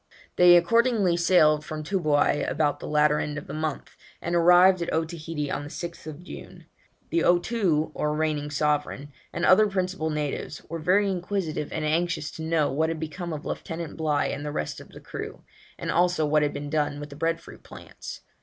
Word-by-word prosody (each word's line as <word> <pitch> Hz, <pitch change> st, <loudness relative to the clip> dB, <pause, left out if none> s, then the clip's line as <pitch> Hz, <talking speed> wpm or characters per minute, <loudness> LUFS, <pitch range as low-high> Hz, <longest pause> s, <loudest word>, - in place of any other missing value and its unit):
They 175 Hz, 0 st, +8 dB
accordingly 210 Hz, 0 st, +3 dB
sailed 155 Hz, -3 st, +4 dB
from 155 Hz, -1 st, -6 dB
Toobouai 155 Hz, -5 st, +1 dB
about 150 Hz, -2 st, 0 dB
the -, -, -7 dB
latter 150 Hz, 0 st, +3 dB
end 150 Hz, 0 st, -3 dB
of -, -, -6 dB
the -, -, -8 dB
month, 155 Hz, -2 st, -4 dB, 0.2 s
and 170 Hz, -, -4 dB
arrived 180 Hz, +2 st, +6 dB
at 170 Hz, -, -2 dB
Otaheite 160 Hz, -2 st, -3 dB
on -, -, -2 dB
the 145 Hz, -, -8 dB
6th 170 Hz, -1 st, -7 dB
June. -, -, -11 dB, 0.5 s
The 335 Hz, -, +2 dB
Otoo, 175 Hz, -4 st, +2 dB
or 150 Hz, 0 st, -1 dB
reigning 150 Hz, -1 st, -1 dB
sovereign, 145 Hz, 0 st, -1 dB, 0.2 s
and 170 Hz, -, -1 dB
other 210 Hz, +3 st, +6 dB
principal 185 Hz, -4 st, -2 dB
natives, 150 Hz, -2 st, -4 dB
were 165 Hz, +1 st, -5 dB
very 185 Hz, +6 st, +3 dB
inquisitive 180 Hz, -5 st, -3 dB
and 155 Hz, -1 st, -2 dB
anxious 165 Hz, 0 st, 0 dB
to -, -, -9 dB
know 160 Hz, -3 st, +1 dB
what 160 Hz, +4 st, +1 dB
had 165 Hz, -1 st, -3 dB
become 170 Hz, +2 st, -5 dB
of 155 Hz, -1 st, -6 dB
Lieutenant 165 Hz, -1 st, -5 dB
Bligh 155 Hz, -2 st, 0 dB
and 145 Hz, -, -5 dB
the 150 Hz, -, -4 dB
rest 75 Hz, -, -4 dB
of -, -, -13 dB
the -, -, -13 dB
crew, -, -, -7 dB, 0.3 s
and -, -, -3 dB
also 175 Hz, -2 st, +2 dB
what 150 Hz, +1 st, +3 dB
had 145 Hz, -1 st, +1 dB
been 145 Hz, 0 st, -6 dB
done 145 Hz, -2 st, 0 dB
with 145 Hz, 0 st, -8 dB
the -, -, -9 dB
bread 165 Hz, +2 st, 0 dB
fruit -, -, -14 dB
plants? -, -, -10 dB
160 Hz, 190 wpm, -26 LUFS, 150-175 Hz, 0.5 s, They